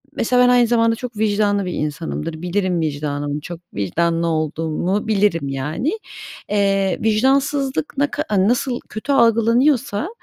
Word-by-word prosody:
mesela, 250 +2 +2
ben 245 - +5
aynı 245 -1 +5
zamanda 230 -1 +2
çok 240 -2 -7
vicdanlı 205 -2 +1
bir 180 - -3
insanımdır. 160 +1 -4
Bilirim 180 -1 -1
vicdanımı 145 -1 -2
çok 170 +1 -8
vicdanlı 165 - 0
olduğumu 165 +6 -1
bilirim, 195 -8 +1
yani. 150 - -2 0.6
Eee, 195 -2 +1
vicdansızlık 270 +5 +1
ne 285 +1 +2
ka 300 - -2 0.2
nasıl 245 +1 0
kötü 215 +7 -4
algılanıyorsa, 235 - +2
205 Hz, 130 wpm, -20 LUFS, 165-240 Hz, 0.6 s, ben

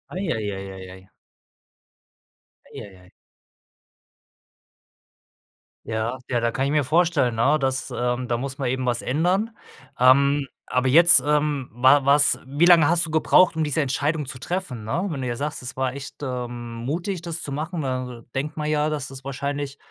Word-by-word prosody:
Ei, 195 - -3
ei, 105 -2 -2
ei, 95 0 -7
ei, 95 -1 -10
ei. 95 +1 -15 1.6
Ei, - - -8
ei, 100 -2 -13
ei. 90 0 -20 2.7
Ja, 115 +3 -3
ja, 120 -2 0
da 115 0 0
kann 135 +3 -1
ich 140 - -1
mir 150 -1 +2
vorstellen, 155 -5 +1
'ne, 140 +7 +3
dass, 130 -1 -1
ähm 125 +1 -2
da 120 -1 -1
muss 135 +1 -5
man 135 -3 -2
eben 130 0 -2
was 120 -1 -1
ändern. 180 - 0 0.5
Ähm, 140 +3 +4 0.2
aber 125 +1 0
jetzt 165 -1 +8
ähm, 150 -3 0
wa 130 +4 +4
was 140 +1 +5
wie 145 +6 +1
lange 170 -4 +6
hast 170 -1 +3
du 160 - -8
gebraucht, 165 +3 +4
diese 155 0 0
Entscheidung 145 +3 -1
zu 125 -1 -8
treffen, 170 - -4
ne? 165 - -2
Wenn 140 -5 -4
du 125 - -3
ja 120 - -2
sagst: 150 +1 -4
„Es 130 +1 -6
war 130 -1 -1
echt, 140 0 -8
ähm, 120 -3 -5
mutig, 170 +5 -3
das 170 -1 -5
zu 140 - -5
machen,“ 160 +4 -4
ne, 140 - -2 0.2
dann 120 -2 -11
denkt 150 +4 -3
man 150 0 -2
ja, 150 0 +1
dass 150 -3 -3
das 135 0 -10
wahrscheinlich 140 +1 -4
140 Hz, 180 wpm, -23 LUFS, 125-155 Hz, 2.7 s, jetzt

